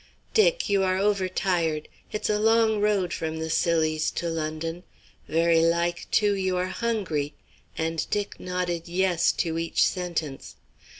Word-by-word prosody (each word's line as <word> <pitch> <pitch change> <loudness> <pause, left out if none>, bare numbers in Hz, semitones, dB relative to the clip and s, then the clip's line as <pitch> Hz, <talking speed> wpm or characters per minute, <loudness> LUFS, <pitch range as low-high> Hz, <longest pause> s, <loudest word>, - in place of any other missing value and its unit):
"Dick, - - +3
you 200 -1 +2
are 185 -1 +1
over 195 -1 +1
tired. 170 -5 0 0.2
It's 210 - -2
a 210 0 +1
long 220 -1 +3
road 200 -5 +1
from 160 0 -3
the 160 0 -3
Scillies 155 -2 +1
to 170 - -2
London. 165 +1 -3 0.5
Very 165 +1 +3
like, 170 +1 +1
too, 205 -1 +3
you 190 -2 0
are 180 +1 -1
hungry," 190 -10 -2 0.4
and 160 0 -1
Dick 205 -1 -2
nodded 180 -2 -3
"yes" 180 -1 +2
to 165 -1 -1
each 165 0 +1
sentence. 170 -6 -3
175 Hz, 145 wpm, -26 LUFS, 165-200 Hz, 0.5 s, Dick